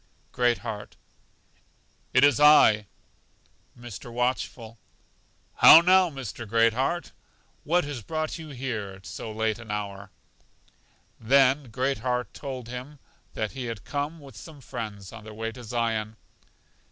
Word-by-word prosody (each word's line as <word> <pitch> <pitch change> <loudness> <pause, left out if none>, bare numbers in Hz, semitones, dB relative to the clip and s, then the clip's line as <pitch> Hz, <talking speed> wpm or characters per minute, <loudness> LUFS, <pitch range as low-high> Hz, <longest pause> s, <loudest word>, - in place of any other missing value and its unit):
Great 120 -1 +2
heart: 105 -2 -6 1.2
It 130 - +4
is 145 0 +5
I 110 -8 +6 0.9
Mr. 120 0 -9
Watchful: 120 -2 -3 0.8
How 165 - +10
now, 185 +1 +5
Mr. 120 - -7
Great 115 +1 +3
heart? 135 +8 -2 0.5
What 175 +4 +2
has 145 -4 -6
brought 155 - -4
you 160 -1 -9
here 120 -7 -4
at 95 +1 -17
so 110 - -7
late 110 0 -1
an 115 -2 -12
hour? 100 -1 -5 1.1
Then 135 +2 +3
Great 130 +3 -1
heart 125 -1 -2
told 130 -4 -7
him 125 +5 -8 0.4
that 110 -1 -2
he 130 -2 -6
had 115 -4 -6
come 145 +3 -3
with 140 -5 -14
some 150 - -11
friends 110 -7 -7
on 115 -2 -10
their 110 0 -10
way 115 +1 -4
to 125 +1 -11
Zion. 110 -2 -2
120 Hz, 140 wpm, -26 LUFS, 110-140 Hz, 1.2 s, How